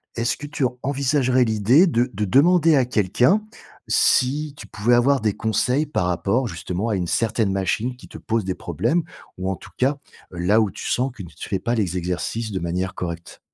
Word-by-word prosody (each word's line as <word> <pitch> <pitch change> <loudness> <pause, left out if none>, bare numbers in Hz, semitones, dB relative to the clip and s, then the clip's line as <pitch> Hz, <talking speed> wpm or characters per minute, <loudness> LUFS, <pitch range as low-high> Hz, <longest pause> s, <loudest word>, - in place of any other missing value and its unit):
Est-ce 115 0 -1
que 145 - -7
tu 145 -2 -1 0.2
envisagerais 135 -2 +2
l'idée 115 - +4
de 120 -5 +1
de 105 +1 -1
demander 160 - +4
à 130 - +3
quelqu'un 125 - +2 0.4
si 145 +3 +2
tu - - -10
pouvais 120 +3 0
avoir 135 +3 +3
des 105 -2 +1
conseils 125 +6 0
par 95 -11 -1
rapport 100 +8 0
justement 100 0 -4
à 110 - 0
une 90 -2 -2
certaine 110 0 0
machine 100 +6 -1
qui - - -14
te - - -11
pose 115 -3 -1
des 95 - -1
problèmes, 115 - -1 0.4
ou 95 +1 -3
en 95 - -2
tout - - -14
cas 135 +3 +1 0.3
là 90 +5 +2
où 110 - +1
tu - - -8
sens 130 +2 0
que 110 - -9
tu 85 - -10
fais 100 - -1
ne - - -12
pas 115 +4 -1
les 95 -5 -1
exercices 90 +6 -3
de 95 - -2
manière 90 +2 -2
correcte? 85 -1 -6
115 Hz, 205 wpm, -22 LUFS, 95-130 Hz, 0.4 s, l'idée